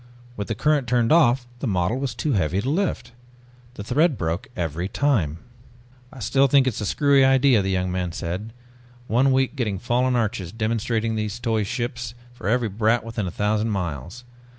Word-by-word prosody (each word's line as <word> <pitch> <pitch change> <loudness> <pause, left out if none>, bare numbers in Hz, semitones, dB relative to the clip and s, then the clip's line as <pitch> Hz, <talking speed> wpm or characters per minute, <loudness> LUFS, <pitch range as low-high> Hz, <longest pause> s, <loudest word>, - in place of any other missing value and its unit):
With 100 -3 -4
the 115 - -2
current 145 +1 +1
turned 120 -1 +2
off 130 -6 +4
the 130 - -3
model 95 +4 0
was 135 -4 -3
too 145 +5 -1
heavy 95 -2 +1
to 105 - -3
lift. 160 -8 -1 0.6
The 100 - -6
thread 145 +5 +2
broke 85 +9 -2
every 85 +1 -2
time. 105 - +1 0.7
"I - - -13
still 135 +5 +3
think 135 0 +4
it's 120 -4 -1
a 105 - -2
screwy 140 +2 +4
idea," 135 -3 +4
the 95 - -2
young 90 -1 0
man 90 -1 -2
said. 90 +7 -5 0.5
"One 125 +4 +2
week 130 +2 +1
getting 110 -7 -1
fallen 125 +4 +1
arches, 110 -6 -1
demonstrating 115 0 -1
those 105 0 -3
toy 115 -2 0
ships 120 +1 -4 0.2
for 120 - -7
every 120 0 +2
brat 110 +3 +1
within 115 -3 -4
a - - -2
thousand 105 +3 0
miles. 90 - -4
115 Hz, 180 wpm, -23 LUFS, 100-130 Hz, 0.7 s, off